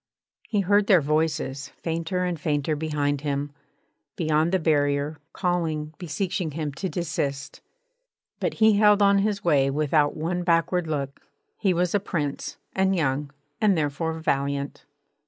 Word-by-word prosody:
He 205 -3 +1
heard 205 +2 +3
their 190 -5 +6
voices, 150 -2 -1 0.2
fainter 165 +2 -1
and 175 -3 -2
fainter 150 0 0
behind 145 -2 -1
him, 145 0 -2 0.6
beyond 155 0 +1
the 190 - +3
barrier, 145 -2 +1
calling, 160 -4 -1
beseeching 175 -1 -2
him 150 -2 -3
to 185 +7 -3
desist. 150 -6 -3 0.8
But - - -1
he 220 -2 +5
held 210 -1 +5
on 200 0 +5
his 200 0 0
way 140 -5 +3
without 145 +1 +1
one 175 +3 -1
backward 170 0 +1
look. 140 -3 -3 0.3
He 195 - +1
was 180 0 +1
a 205 - +3
Prince, 155 -8 -3 0.2
and 190 0 +2
young, 145 -3 0 0.3
and 205 -4 +4
therefore 160 +2 -1
valiant. 140 -2 -2
160 Hz, 140 wpm, -25 LUFS, 145-180 Hz, 0.8 s, their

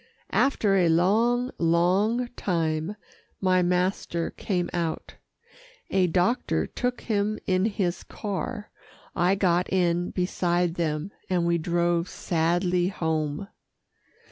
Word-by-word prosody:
After 225 -7 +2
a 175 -3 +3
long, 230 +9 +2
long 185 +9 +2
time 165 -3 -1 0.4
my 185 -1 +3
master 180 -1 0
came 180 -4 -2
out. 165 -2 -3 0.7
A 190 -1 +3
doctor 180 +8 +1
took 250 -1 -3
him 215 -1 0
in 185 +1 +2
his 195 -5 -1
car, 205 +1 -5 0.4
I 180 +3 +3
got 180 -2 +1
in 175 -1 +1
beside 175 -1 0
them, 160 +1 -2 0.2
and 180 -2 +1
we 170 0 +2
drove 170 +1 0
sadly 175 +2 0
home. 160 -2 -2
180 Hz, 110 wpm, -26 LUFS, 170-200 Hz, 0.7 s, a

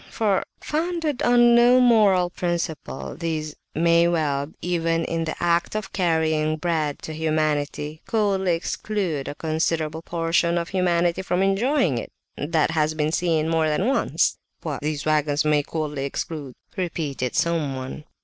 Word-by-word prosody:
For, 205 -4 +1 0.2
founded 320 -3 -2
on 240 -1 +5
no 240 +1 +6
moral 205 -7 +4
principle, 170 -6 -3
these 155 -2 -3 0.2
may 170 +1 +4
well, 150 -4 0
even 165 -1 0
in 165 0 -2
the 160 - -3
act 170 +3 +1
of 215 -2 -4
carrying 160 -3 +1
bread 155 -3 -1
to 160 - -5
humanity, 155 -1 -1
coldly 195 -5 +1
exclude 170 -4 -3
a - - -5
considerable 160 0 -1
portion 170 0 0
of 170 0 -2
humanity 175 -1 +1
from 185 0 0
enjoying 195 - +2
it; - - -8 0.2
that 155 +1 0
has 155 -1 +1
been 155 0 0
seen 165 -2 +1
more 160 -1 +2
than 155 +6 0
once." 270 +3 +1 0.3
"What, - - -4
these 150 0 -3
waggons 150 -1 +1
may 150 -1 +3
coldly 150 -2 -3
exclude?" 140 -1 -5 0.2
repeated 150 -8 -3
someone. 145 -4 -1
165 Hz, 140 wpm, -23 LUFS, 155-180 Hz, 0.3 s, no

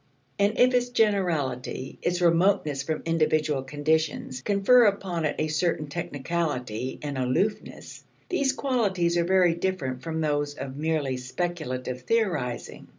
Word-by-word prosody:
And 200 +2 +2
if 250 +1 +5
its 245 0 +2
generality, 170 - 0
its 175 +1 0
remoteness 170 -4 +3
from 155 +2 -3
individual 155 -3 +1
conditions, 145 -1 -1
confer 205 - +5
upon 190 -5 0
it 150 - 0
a 155 - 0
certain 155 0 0
technicality 145 -6 -3
and 145 -3 -3
aloofness, 130 +12 -2 0.2
these 280 -7 +1
qualities 205 -11 0
are 170 -1 +2
very 180 -2 +4
different 165 -8 -2
from 160 +1 -4
those 145 -2 0
of 135 -1 -6
merely 150 -3 -1
speculative 130 -2 -4
theorizing. 160 - -1
160 Hz, 130 wpm, -26 LUFS, 140-190 Hz, 0.2 s, if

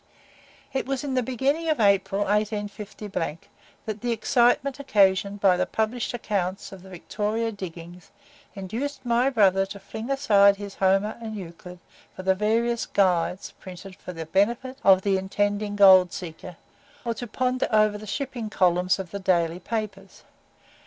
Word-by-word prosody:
It 265 -1 -2
was 270 0 -2
in 280 -2 -3
the 255 - +2
beginning 270 +7 -1
of 310 - +1
April, 200 -1 +2
185, 205 -5 -3 0.5
that 215 -2 -5
the 245 - -1
excitement 245 +4 +2
occasioned 200 -5 +2
by 190 -2 +4
the - - 0
published 225 +2 -2
accounts 195 -4 -3
of 195 -2 -11
the 190 - -14
Victoria 210 +5 -3
"Diggings," 175 -3 -9 0.5
induced 250 +9 -5
my 240 +2 +2
brother 195 -6 +3
to 200 +1 -9
fling 220 +5 -8
aside 205 -8 +4
his 200 0 -8
Homer 195 +4 +1
and 220 -1 -6
Euclid 180 -1 -9 0.4
for 185 - -8
the 190 0 +3
various 230 +4 0
"Guides" 180 -1 +1
printed 185 +1 -10
for 180 - -9
the 165 -2 -7
benefit 235 - 0
of 190 -1 +6
the 195 -2 +2
intending 205 +2 -1
gold 190 -3 +7
seeker, 175 0 -8 0.5
or 235 - 0
to 240 +2 -7
ponder 255 +3 -1
over 215 -1 +3
the 215 - -10
shipping 245 -2 -4
columns 180 -2 +2
of 190 -3 -7
the 200 - -5
daily 175 -3 +1
papers. 195 -2 -6
205 Hz, 155 wpm, -25 LUFS, 190-230 Hz, 0.5 s, gold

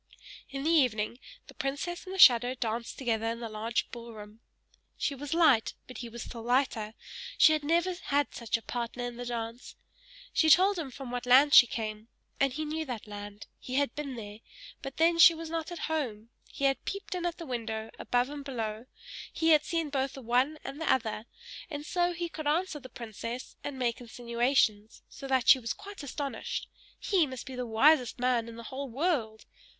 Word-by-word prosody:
In 275 0 -5
the 320 - +2
evening, 245 -7 +2 0.3
the - - -14
princess 285 +6 -3
and 380 - -5
the - - -5
shadow 250 -7 +7
danced 230 -1 -3
together 225 -4 -1
in 230 +1 -2
the 235 - -4
large 220 +2 -2
ball 235 -1 -8
room. 210 +1 -11 0.6
She 285 - -1
was 285 +3 -4
light, 285 -10 +4
but 255 - -10
he 240 - -6
was 235 +1 -7
still 235 - -8
lighter; 230 -3 0 0.4
she 315 - +7
had 305 -1 -1
never 340 +4 +2
had 285 0 +1
such 230 -2 -1
a 225 - -13
partner 240 +2 -4
in 245 -1 -5
the 245 0 -5
dance. 230 0 -5 0.6
She 320 - +3
told 375 +3 +6
him 300 -5 -4
from 260 -1 -8
what 245 0 -4
land 275 +4 +6
she 245 -4 +10
came, 215 -1 -5 0.3
and 275 -1 +3
he 310 +4 -3
knew 315 +1 -2
that 245 -6 -5
land; 205 0 -8
he 255 - -6
had 280 -3 +1
been 280 -3 -5
there, 210 -2 -8 0.4
but 270 -1 -7
then 335 +1 +3
she 335 0 +9
was 325 0 -7
not 330 +1 -3
at 345 - -6
home; 240 -9 -3 0.2
he - - -7
had 270 -2 +2
peeped 395 0 -5
in 360 -1 -3
at 345 - -4
the 335 - -7
window, 225 -4 -4
above 245 +2 0
and 290 -1 -6
below 230 -3 -4 0.4
he 325 - +1
had 305 -2 +6
seen 325 -2 -2
both 270 -1 -1
the 270 - -9
one 250 +6 +2
and 275 +3 -7
the - - +2
other, 225 -2 -1 0.4
and 295 -2 -6
so 350 +2 +1
he 345 0 -3
could 310 -2 -6
answer 315 +1 0
the 260 -2 -11
princess, 235 +1 -7
and 285 -2 -5
make 245 -2 -1
insinuations, 235 -2 0
so 275 - -9
that 260 -1 +1
she 265 - +8
was 230 -2 -3
quite 405 -2 -10
astonished; 285 0 -4 0.3
he 360 -6 +2
must 260 -2 -7
be 265 - -8
the 250 -1 -4
wisest 250 +2 +4
man 245 -2 +1
in 230 - -9
the 235 - -9
whole 275 0 -4
world! 245 -6 -1
255 Hz, 205 wpm, -30 LUFS, 230-300 Hz, 0.6 s, she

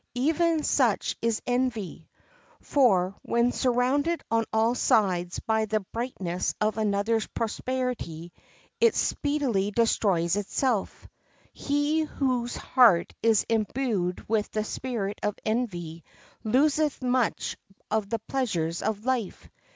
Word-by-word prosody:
Even 320 +4 +1
such 245 -9 +1
is 230 -1 0
envy; 245 -5 -2 0.5
for 195 -10 +2
when 235 +1 +1
surrounded 265 +7 +1
on 225 0 +2
all 225 +2 +2
sides 180 -7 +1
by 220 -1 0
the 215 0 0
brightness 195 -4 -3
of 215 -1 +1
another's 215 +1 +1
prosperity 230 -8 -3 0.5
it 465 -1 +4
speedily 270 -10 0
destroys 200 -5 +1
itself. 210 +2 -1 0.5
He 290 +2 0
whose 255 -5 -1
heart 225 -10 +4
is 225 -2 +3
imbued 220 -5 -1
with 215 -1 0
the 215 - -2
spirit 215 -3 -4
of 210 -1 -1
envy 175 -8 -2 0.4
loseth 285 +5 +2
much 250 -2 0 0.4
of 215 -2 0
the 230 - 0
pleasures 200 -9 -2
of 215 +1 -2
life. 255 -6 -2
225 Hz, 110 wpm, -27 LUFS, 200-255 Hz, 0.5 s, it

